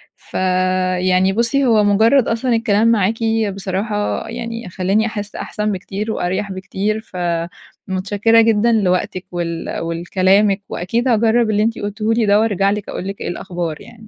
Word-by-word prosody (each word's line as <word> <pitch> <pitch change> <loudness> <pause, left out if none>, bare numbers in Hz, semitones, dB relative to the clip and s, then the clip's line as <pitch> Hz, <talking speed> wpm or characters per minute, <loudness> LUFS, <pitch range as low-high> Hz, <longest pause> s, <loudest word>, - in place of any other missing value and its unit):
فيعني 185 0 +1
بُصّي 240 +5 +1
هو 220 -4 +4
مجرّد 225 +6 +4
أصلًا 230 +2 0
الكلام 225 0 +2
معاكِ 220 -2 +2 0.4
بصراحة 200 +2 -2
يعني 230 -2 -6
خلّاني 195 +5 0
أحسّ 210 -2 -5
أحسن 210 0 -3
بكتير 200 +3 -4
وأريح 195 +2 -2
بكتير، 200 +3 -3
فمتشكِّرة 190 +4 -1
جدًا 225 +1 +3
لوقتِك، 185 -3 0
ول 170 -1 -3
ولكلامِك 190 +4 +1
وأكيد 230 +8 -2
هاجرَّب 230 0 +3
اللي 210 0 +2
أنتِ 225 +1 -1
قلتيه 215 +2 -2
لي 225 -1 +1
ده، 205 0 +4
وأرجع 200 -3 +2
لِك 210 -1 -4
أقول 190 - -5
لِك 195 - -6
إيه - - -3
الأخبار 175 -3 -4
يعني. 225 -2 -14
205 Hz, 145 wpm, -18 LUFS, 185-225 Hz, 0.4 s, هو